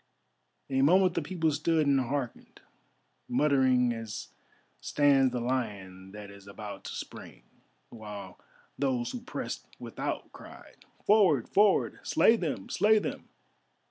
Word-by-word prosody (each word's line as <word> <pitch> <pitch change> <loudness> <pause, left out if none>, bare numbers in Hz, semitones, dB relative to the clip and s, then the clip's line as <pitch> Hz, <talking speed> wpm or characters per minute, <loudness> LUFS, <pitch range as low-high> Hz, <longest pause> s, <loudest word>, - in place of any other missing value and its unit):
A 135 0 +2
moment 180 +5 +4
the - - -1
people 160 0 -1
stood 155 +2 +1
and 140 -1 +3
hearkened, 130 -1 -4 0.7
muttering 130 -4 +3
as 115 -2 -7 0.5
stands 135 - +3
the 125 - -2
lion 100 -7 -4
that 105 0 -10
is 100 0 -15
about 100 0 -9
to - - -6
spring, - - -9 0.5
while 105 -5 -9 0.4
those 130 -3 0
who 250 - -6
pressed 240 - -6
without - - -5
cried: - - -14 0.3
"Forward! 190 - +4
Forward! 205 -1 +3
Slay 225 - +4
them! 155 - -3
Slay 215 +3 +3
them!" 210 - -4
130 Hz, 125 wpm, -29 LUFS, 110-160 Hz, 0.7 s, moment